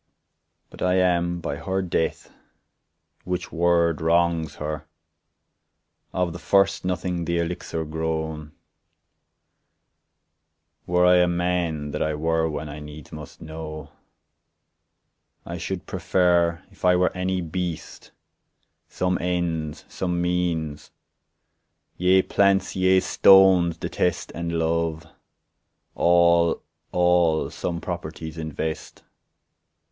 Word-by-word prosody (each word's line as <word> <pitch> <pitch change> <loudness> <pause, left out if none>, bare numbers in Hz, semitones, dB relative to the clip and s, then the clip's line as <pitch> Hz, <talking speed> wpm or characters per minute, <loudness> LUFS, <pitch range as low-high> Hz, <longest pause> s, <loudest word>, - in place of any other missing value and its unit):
But - - -13
I 90 0 +2
am 85 -1 +1
by 70 - -3
her 95 +4 -2
death—which 90 +1 -6
word 85 -1 +2
wrongs 85 -1 +1
her— 75 -1 -5 1.2
Of 90 -3 -1
the 85 - -8
first 100 +2 +2
nothing 90 -1 -2
the 85 +1 0
elixir 85 -1 -3
grown; 80 -1 -3 2.4
Were 90 0 +3
I 90 0 +6
a 90 0 +4
man, 85 -4 -1
that - - -4
I 75 -1 0
were 80 +1 0
one 75 0 -4
I 75 +1 -7
needs 75 -1 -11
must 75 -2 -10
know; 80 -1 -8 1.5
I 85 0 -6
should 90 +1 -4
prefer, 85 -1 +1
If - - -21
I 90 0 +5
were 90 +1 +1
any 95 0 -1
beast, 90 -1 -5 0.8
Some 90 0 -1
ends, 85 -3 -2
some 90 -2 -2
means; 85 -4 -1 1.1
yea 95 +1 +4
plants, 100 -1 +2
yea 95 0 +4
stones 95 -4 +5
detest, 90 +1 -2
And 85 0 -4
love; 80 0 -1 0.9
all, 85 -1 +3 0.3
all 90 -2 +2
some 85 -1 -3
properties 80 -2 -6
invest. 80 0 -5
85 Hz, 105 wpm, -24 LUFS, 80-90 Hz, 2.4 s, I